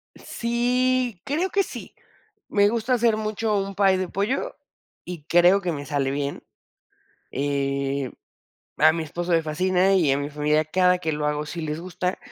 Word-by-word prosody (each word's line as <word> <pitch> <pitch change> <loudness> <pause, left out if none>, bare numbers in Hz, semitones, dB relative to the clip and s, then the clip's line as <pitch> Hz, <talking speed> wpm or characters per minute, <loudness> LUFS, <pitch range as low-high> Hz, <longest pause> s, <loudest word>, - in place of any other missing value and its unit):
Sí, 245 -2 0
creo 320 +7 0
que 395 0 +2
sí, - - -9 0.5
me 205 0 +4
gusta 230 +3 0
hacer 235 -2 +3
mucho 215 0 -1
un 195 0 -3
pay 195 -1 +4
de 185 0 -2
pollo 205 +9 -2 0.5
y 175 -4 -7
creo 175 +4 +5
que 180 -2 -1
me 145 -3 -5
sale 140 -2 -1
bien, 140 0 -3 0.9
eh, 140 -1 -1 0.7
a 155 +2 +6
mi 165 0 -2
esposo 175 +3 -4
le 165 -1 +3
fascina 185 +4 +2
y 165 -8 +3
a 135 - +1
mi 145 0 -3
familia 150 +1 +1
cada 180 +3 +3
que 165 -3 -2
lo 150 0 -2
hago 150 0 -1
sí 170 +3 -5
les 155 0 -3
gusta, 180 +1 -3
180 Hz, 170 wpm, -24 LUFS, 150-210 Hz, 0.9 s, a